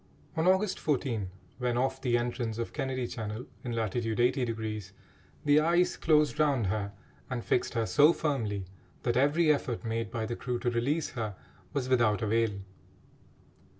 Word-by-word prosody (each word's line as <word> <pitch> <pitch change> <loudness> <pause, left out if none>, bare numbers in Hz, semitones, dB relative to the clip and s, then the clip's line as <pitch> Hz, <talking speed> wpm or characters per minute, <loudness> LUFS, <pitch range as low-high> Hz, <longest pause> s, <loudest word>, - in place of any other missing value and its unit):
On 160 +2 +1
August 190 +1 +3
14, 120 -9 -1 0.3
when 125 -1 0
off 130 +1 0
the 120 -2 +2
entrance 120 -2 -2
of 115 - -4
Kennedy 130 -3 -2
Channel, 110 0 -5 0.2
in 120 -2 -3
latitude 115 0 -1
80°, 110 -5 0 0.5
the 145 +1 +6
ice 170 +3 +3
closed 150 -1 +3
round 140 -7 +3
her 100 +1 -1 0.4
and 125 -2 -3
fixed 125 - +1
her 115 -1 +1
so 145 - +6
firmly 115 - -1 0.4
that 120 - +1
every 150 +4 +4
effort 125 -5 -3
made 115 -1 -2
by 110 -1 -3
the 120 - -3
crew 125 0 -2
to 120 0 -1
release 140 +7 0
her 110 -5 -4 0.4
was 130 -3 -1
without 115 -5 +3
avail. 110 0 +2
120 Hz, 155 wpm, -30 LUFS, 110-140 Hz, 0.5 s, the